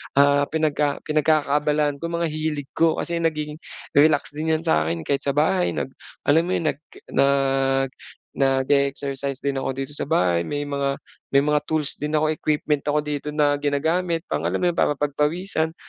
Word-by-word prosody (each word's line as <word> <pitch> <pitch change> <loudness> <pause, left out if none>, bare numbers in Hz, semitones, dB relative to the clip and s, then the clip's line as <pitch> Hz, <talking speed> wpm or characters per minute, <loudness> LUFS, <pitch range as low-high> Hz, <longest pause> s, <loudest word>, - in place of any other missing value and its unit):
ah, 140 0 +5
pinagka 150 -2 0
pinagkakaabalahan 150 -1 +1
ko, 170 - -5
mga 170 -1 0
hilig 155 -2 -3
ko, 165 -1 +4
kasi 170 -1 -2
naging 155 -2 -2 0.4
relax 145 0 +4
din 160 +1 0
yan 160 - 0
sa 160 - +2
akin 85 0 -2
kahit 140 - -1
sa 140 - +1
bahay 175 +4 +2
nag - - -3 0.4
alam 160 +4 +4
mo 185 - 0
yun, 155 -2 +1
nag 135 - -14 0.3
nag 135 -1 +2 0.5
nag-e-exercise 140 0 0
din 140 -1 -1
ako 135 - -2
dito 135 +2 -4
sa - - -2
bahay, 85 -2 +2
may 145 0 -3
mga 140 -1 -1 0.4
may 140 - +6
mga 150 +1 +2
tools 155 -2 -1
din 150 +1 -4
ako, 155 0 +2
equipment 150 -1 0
ako 150 0 +1
dito 150 0 -4
na 145 -1 +2
ginagamit 160 +4 0
pang - - -2
alam - - -1
mo 180 - +3
'yon, 170 - -4
para 150 - +3
pagpawisan, 160 +4 -1
150 Hz, 180 wpm, -23 LUFS, 140-155 Hz, 0.5 s, may